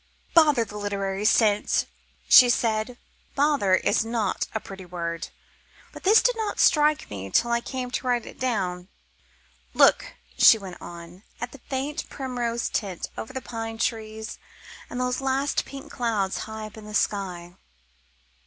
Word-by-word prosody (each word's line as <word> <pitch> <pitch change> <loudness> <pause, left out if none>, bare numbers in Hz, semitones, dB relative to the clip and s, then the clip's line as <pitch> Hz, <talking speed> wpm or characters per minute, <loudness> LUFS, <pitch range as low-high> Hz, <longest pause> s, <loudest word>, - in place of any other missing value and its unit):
"Bother 300 -8 +5
the 210 0 -9
literary 200 0 -2
sense," 215 -2 +3 0.4
she 250 -2 +9
said. 230 0 0 0.4
"Bother" 280 -10 +3
is 200 +3 +1
not 225 -3 -1
a - - +1
pretty 195 -2 -10
word, 170 -2 -5 0.7
but - - -10
this 420 +4 +5
did - - +3
not 435 -2 -3
strike 300 0 +4
me 95 -1 -6
till 235 - +2
I 235 0 +2
came 250 0 -5
to 255 - -3
write 245 -2 +1
it - - -12
down. 185 -8 -2 0.9
"Look," - - +4 0.2
she 225 - +8
went 190 -4 -10
on, 170 +1 -10 0.2
"at 245 - -5
the 280 - -13
faint 285 +3 -3
primrose 245 -3 -3
tint 195 -5 -3
over 220 - -6
the 260 0 -5
pine 225 -1 -5
trees 220 -1 -3 0.5
and 245 - -5
those 250 +1 -1
last 270 +1 0
pink 275 +2 -10
clouds 220 -6 -1
high 220 0 -6
up 215 0 -11
in 215 - -10
the 210 0 -7
sky." 180 -5 -1
225 Hz, 155 wpm, -25 LUFS, 195-255 Hz, 0.9 s, she